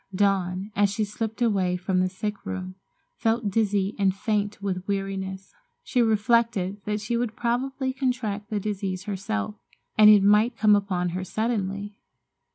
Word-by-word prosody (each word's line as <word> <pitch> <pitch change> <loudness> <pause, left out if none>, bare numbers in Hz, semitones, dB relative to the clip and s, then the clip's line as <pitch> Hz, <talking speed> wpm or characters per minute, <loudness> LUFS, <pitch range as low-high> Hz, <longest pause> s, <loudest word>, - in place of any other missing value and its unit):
Dawn, 195 0 +1
as 205 0 +3
she 205 +2 -1
slipped 220 +3 -3
away 190 -5 +1
from 185 +1 0
the 185 0 +2
sick 205 +2 -5
room, 185 0 -5 0.4
felt 225 -2 0
dizzy 205 -1 +1
and 190 -1 +2
faint 210 -1 -1
with 190 -2 -3
weariness. 195 -1 -3 0.3
She 250 - +1
reflected 220 -3 +2
that 210 0 -1
she 220 +3 -2
would 235 -2 -1
probably 260 +2 -1
contract 245 -6 -2
the 210 -2 -1
disease 195 -2 -3
herself, 210 +1 -3 0.5
and 210 0 +9
it 210 -2 +7
might 210 +4 +4
come 210 -1 +5
upon 185 -3 0
her 185 +2 -3
suddenly. 205 -1 -2
205 Hz, 155 wpm, -25 LUFS, 190-220 Hz, 0.5 s, and